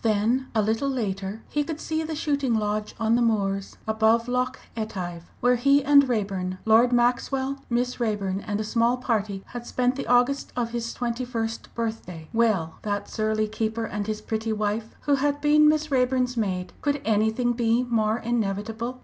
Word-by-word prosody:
Then 225 +4 +1
a 215 - +3
little 225 +6 0
later 205 -4 -3
he 295 - 0
could 310 +1 -5
see 315 0 -2
the 320 0 -4
shooting 285 -5 0
lodge 210 0 -1
on 225 0 +2
the 240 - +3
moors 195 -4 0
above 220 +2 +3
Loch 250 +1 0 0.2
Etive, 180 -6 -5
where 245 +1 +4
he 275 +3 +4
and 280 -1 +6
Raeburn, 195 -5 -1
Lord 225 +3 +5
Maxwell, 265 +3 +1
Miss 245 +1 -1
Raeburn, 205 -4 -1
and 210 -1 -1
a - - -1
small 235 +3 +2
party 210 -5 -1
had 240 -1 -7
spent 250 0 +1
the 275 - -5
August 245 +3 +2
of 235 -2 -1
his 230 -1 -3
twenty 240 0 -2
first 230 -2 -4
birthday. 220 -8 -4
Well 215 -8 +1
that 205 -1 -3
surly 215 0 0
keeper, 220 +1 -2
and 210 -1 -4
his 215 0 -3
pretty 220 +1 -2
wife 215 +1 -2
who 290 - +1
had 285 +1 0
been 300 +1 +5
Miss 310 0 0
Raeburn's 250 -1 +2
maid 185 -5 -2
could 290 0 0
anything 220 +3 +2
be 235 0 +2
more 225 -3 +1
inevitable? 230 +1 -2
230 Hz, 175 wpm, -25 LUFS, 215-250 Hz, 0.2 s, and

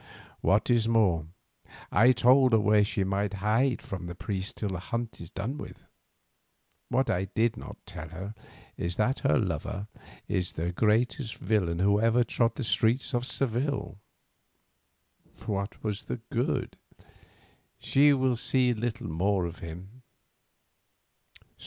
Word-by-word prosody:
What 105 +5 +2
is 115 -2 +3
more, 95 -9 +2 0.6
I 115 +6 +6
told 125 +1 +5
her 110 - +6
where 105 0 +4
she 100 -1 0
might 100 +1 -1
hide 110 +6 +1
from 90 -4 -6
the 85 - -6
priests 95 +1 -3
till 105 - -4
the 95 -2 -3
hunt 115 +3 -4
is 85 - -8
done 120 +10 -4
with. - - -10 1.0
What 130 +2 +1
I 90 +1 0
did 110 +4 0
not - - -9
like - - -43
to - - -8
tell 80 - -6
her 95 +6 -7 0.4
is 85 0 -2
that 125 +7 +1
her 140 - +2
lover 100 - -2 0.4
is 90 -1 -1
the 85 +2 -2
greatest 115 - +1
villain 90 -4 0
who 100 +3 +3
ever 115 +2 +4
trod 115 0 0
the 135 - -3
streets 120 +4 +1
of 120 +1 0
Seville. 135 -4 -1 1.5
What 100 0 -3
was 105 -1 -2
the - - -5
good? 120 +3 -1 1.0
She 145 +2 +4
will 130 -3 +2
see 125 +1 +2
little 120 +1 -3
more 95 +3 +1
of 85 0 -6
him. 90 +9 -9
110 Hz, 145 wpm, -28 LUFS, 95-120 Hz, 1.5 s, I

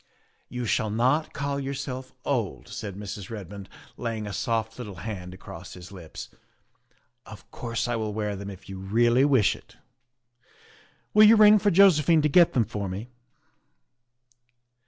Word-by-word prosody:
" - - -42
You 125 - -2
shall 110 0 0
not 130 +9 +1
call 140 -1 -3
yourself 130 -1 -5
old," 105 - -2
said 100 -3 -6
Mrs. 100 -1 -7
Red 105 -5 -7
mond, 100 -1 -9 0.3
laying 115 -3 -3
a 100 - -5
soft 115 -1 -2
little 105 -6 -7
hand 90 -1 -6
across - - -10
his 90 +1 -11
lips; 85 -5 -9 0.5
" - - -40 0.2
of 110 -1 -13
course 115 -2 -3
I 120 - -1
will 110 -1 -2
wear 105 -1 -2
them 100 +1 -7
if 95 -3 -11
you 95 -1 -7
really 120 +6 +3
wish 130 -8 +3
it. - - -18 1.4
Will 215 0 +8
you 225 - +8
ring 215 -1 +7
for 205 - +2
Josephine 165 -5 +5
to 150 - +3
get 170 +3 +5
them 120 -3 +2
for 105 -3 -4
me?" 100 +6 -6
115 Hz, 165 wpm, -26 LUFS, 100-135 Hz, 1.4 s, Will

